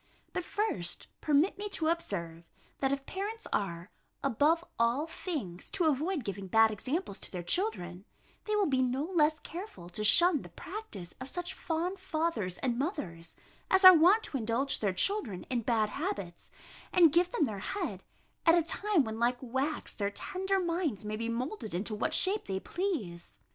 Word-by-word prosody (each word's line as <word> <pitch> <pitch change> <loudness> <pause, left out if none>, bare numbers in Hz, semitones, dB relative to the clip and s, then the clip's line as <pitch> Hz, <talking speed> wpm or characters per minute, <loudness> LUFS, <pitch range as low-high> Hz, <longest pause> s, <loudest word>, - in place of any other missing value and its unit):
But 365 - -2
first, 335 - -2 0.2
permit 305 +7 +2
me 415 0 -3
to 320 -2 +1
observe, 170 - -3 0.4
that 270 -1 +1
if 275 0 -2
parents 420 +4 -5
are, 175 -2 -2 0.3
above 300 +6 +2
all 235 +6 +2
things, 290 - -5
to 360 -4 +1
avoid 310 +2 +1
giving 200 -2 -5
bad 220 +3 +5
examples 255 - -3
to - - -7
their 180 -2 -5
children, 180 - -1 0.4
they 425 - 0
will 415 -1 +3
be 265 -5 +2
no 255 +2 0
less 310 -3 +2
careful 330 - -8
to 210 +4 -5
shun 335 - +6
the - - -11
practice 200 - -8
of 260 - -6
such 355 +2 -3
fond 350 +3 -2
fathers 315 - -1
and 245 -2 0
mothers, 170 - -4 0.3
as 380 0 +5
are 370 - +13
wont 365 +7 +5
to 280 - -3
indulge 240 +4 0
their 205 -3 +1
children 215 - 0
in 245 -2 +1
bad 220 -2 +1
habits, 245 - -4 0.4
and 335 -5 +6
give 350 +1 +3
them 310 - +2
their 210 -6 -4
head, 230 - -4 0.5
at 330 +1 +7
a 340 - +3
time 380 0 +1
when, 220 -1 -5
like 240 +1 +2
wax, 265 +5 -2
their 200 -1 -1
tender 380 - -1
minds 335 - -1
may 210 0 -3
be 230 +1 -3
moulded 235 - -3
into 205 +5 -1
what 210 - 0
shape 400 +3 +4
they 190 -1 -2
please. 225 - -4
275 Hz, 175 wpm, -31 LUFS, -, 0.5 s, are